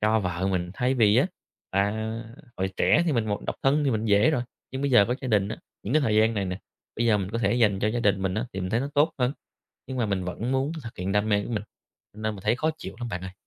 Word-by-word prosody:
cho 110 +1 +3
vợ 90 0 -1
mình. 90 -2 -1
Thay 125 +1 +1
vì 110 -4 +4
á, - - +4 0.4
à, 100 +2 +2 0.6
hồi 95 0 -1
trẻ 160 - +4
thì 160 - +2
mình 115 -4 +1
một 105 -1 -2
độc - - -2
thân 145 +2 +3
thì 140 - +2
mình 110 -2 -1
dễ 105 +8 +5
rồi, 135 -6 0 0.3
nhưng 135 +1 -4
bây 140 - +1
giờ 120 -5 +7
có 125 - +1
gia 130 - -3
đình 100 -3 +2
á, 110 - -4 0.3
những 115 - -2
cái 155 - +5
thời 110 -5 +2
gian 110 +1 +4
này 100 -2 0
nè, 90 0 -3 0.4
bây 120 +1 +1
giờ 105 -2 +4
mình 95 -1 -3
có 115 - -2
thể 120 - +2
dành 105 -5 +3
cho 105 - +2
gia 120 +2 -1
đình 100 -4 +2
mình 95 -1 0
á 110 +5 -1
thì 95 - -4
mình 90 +1 -3
thấy 115 - +2
nó 140 - -2
tốt 150 +3 +4
hơn. 125 0 +2 0.5
Nhưng 130 - -5
mà 120 -3 +1
mình 95 -3 -1
vẫn 110 +8 -3
muốn 135 +3 0
thực 115 - -8
hiện 95 +2 -2
đam 105 +1 +1
mê 100 -1 +2
của - - -7
mình, 105 -2 -1 0.5
nên 110 0 -3
mình 95 - -11
thấy 110 +3 +3
khó 155 +3 +1
chịu - - -7
lắm 120 - -3
bạn 90 -5 -4
ơi. 95 0 -6
110 Hz, 300 wpm, -26 LUFS, 100-125 Hz, 0.6 s, giờ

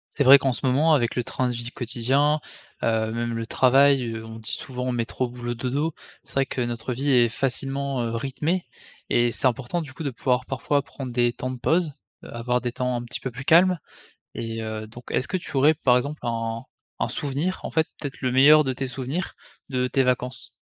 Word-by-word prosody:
C'est 140 - +2
vrai 140 +2 +9
qu'en 135 -1 +1
ce 135 - 0
moment, 145 +5 +4
avec 120 -5 +1
le 125 - 0
train 125 +2 -1
de 125 - -1
vie 120 0 -4
quotidien, 135 +6 +1 0.4
heu, 110 -1 +1
même 115 0 -2
le 115 0 -3
travail, 135 +2 +4
heu, 110 0 -7
on 110 0 -9
dit 110 - -4
souvent: 125 -1 -3
«Métro, 120 +1 -2
boulot, 120 0 -4
dodo». 135 +7 -1 0.3
C'est - - -10
vrai 135 0 +2
que 125 - -3
notre 120 0 -3
vie 140 +4 0
est 120 -2 +5
facilement, 135 +2 -1
heu, 115 0 -2
rythmée 150 +8 -1 0.5
et 120 0 +3
c'est 130 - +2
important, 130 +7 -1
du 145 -5 -8
coup, 160 - -7
de 140 - -2
pouvoir, 125 +1 0
parfois, 140 +2 0
prendre 135 -3 -7
des 120 0 +2
temps 130 +1 -4
de 130 - -6
pause, 160 +2 +1 0.3
heu, - - -10
avoir 125 +1 0
des 120 +1 -2
temps 125 +1 -1
un 120 - -3
petit 120 - -5
peu 130 - -4
plus 130 +3 -8
calmes 180 +3 +5 0.6
et 115 -1 -4
heu, 110 0 -5
donc 120 +3 -12
est-ce 130 - 0
que 185 - -1
tu 170 - -6
aurais, 145 +4 +5
par 130 -5 +3
exemple, 145 +4 -2
un 115 -1 -2 0.4
un - - +1
souvenir, 150 +6 -1
en - - -5
fait, 160 -1 +2
peut-être 145 -3 -6
le 130 - +1
meilleur 145 +4 +7
de 135 -3 -1
tes 135 +1 -3
souvenirs, 135 +7 -4 0.3
de 125 -2 0
tes 135 +1 +2
vacances? 125 0 -1
130 Hz, 220 wpm, -24 LUFS, 120-140 Hz, 0.6 s, vrai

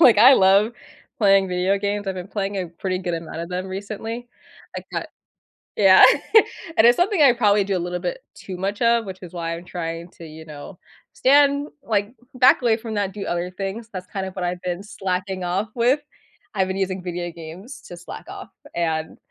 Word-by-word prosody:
Like, 240 -9 +7
I 255 +5 +9
love 200 +3 +4 0.5
playing 195 -2 +4
video 180 +2 +1
games; 205 0 -2
I've 190 - -2
been 180 - -6
playing 200 -1 -3
a 185 - -2
pretty 185 +2 -3
good 180 -2 -3
amount 165 -1 -6
of 170 - -5
them 185 +1 -4
recently. 220 +5 -6 0.5
I - - -4
got - - -3 0.7
Yeah. 190 -2 +7 0.7
And 225 - +7
it's 240 - +6
something 370 -1 +2
I 275 -4 +7
probably 210 -4 +3
do 195 -1 -1
a - - -2
little 180 0 -3
bit 180 0 -3 0.2
too 185 -2 -8
much 200 +4 -3
of, 235 -1 +3
which 190 -1 -8
is 175 - -10
why 165 -1 -3
I'm 170 - -10
trying 170 -1 -5
to, 165 - -10
you 160 0 -11
know, 155 +4 -10 0.3
stand 280 +2 +3
like, 210 -1 -1 0.2
back 255 +1 +5
away 230 -2 +3
from 225 -1 -6
that, 200 -2 -1
do 200 -2 -6
other 175 0 -2
things. 195 +5 -5
That's 185 0 -6
kind 195 0 -4
of 190 - -9
what 180 - -2
I've 180 +1 -3
been 180 +1 -3
slacking 190 -2 -3
off 190 +5 -1
with. 250 +4 +3 0.6
I've 190 -1 +1
been 190 - -3
using 190 -1 -2
video 175 -1 -4
games 170 - -10
to 175 - -9
slack 175 - -9
off, 390 0 -9 0.3
and, 160 -2 -2
195 Hz, 205 wpm, -22 LUFS, 180-220 Hz, 0.7 s, I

